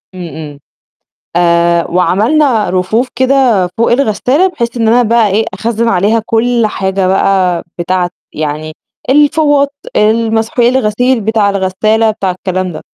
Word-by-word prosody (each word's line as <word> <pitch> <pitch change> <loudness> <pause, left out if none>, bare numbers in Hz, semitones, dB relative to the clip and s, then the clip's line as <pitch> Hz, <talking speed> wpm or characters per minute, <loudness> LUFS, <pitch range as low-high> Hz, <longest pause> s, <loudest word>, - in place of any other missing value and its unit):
امم، 180 -2 -7
امم. 150 -3 -9 0.8
آآ، 170 0 +2
وعملنا 220 - +1
رفوف 190 +7 0
كده 255 -6 +2
فوق 230 - +2
الغسالة 270 - +1
بحيث 235 -9 -4
إن 225 -2 +1
أنا 240 +2 +4
بقى 230 -2 +2
إيه، 210 +3 0
أخزن 230 0 -1
عليها 215 +2 +1
كل 230 0 +1
حاجة 190 -2 -2
بقى 185 -2 +1 0.2
بتاعة 175 0 -1 0.2
يعني 155 +1 -4 0.4
الفوط، 290 0 +2 0.2
المسحوق 225 +2 +1
الغسيل 245 0 +1
بتاع 215 -1 +1
الغسالة 205 +3 0
بتاع 195 -3 -2
الكلام 185 0 -3
ده. 155 - -8
215 Hz, 130 wpm, -12 LUFS, 185-240 Hz, 0.8 s, أنا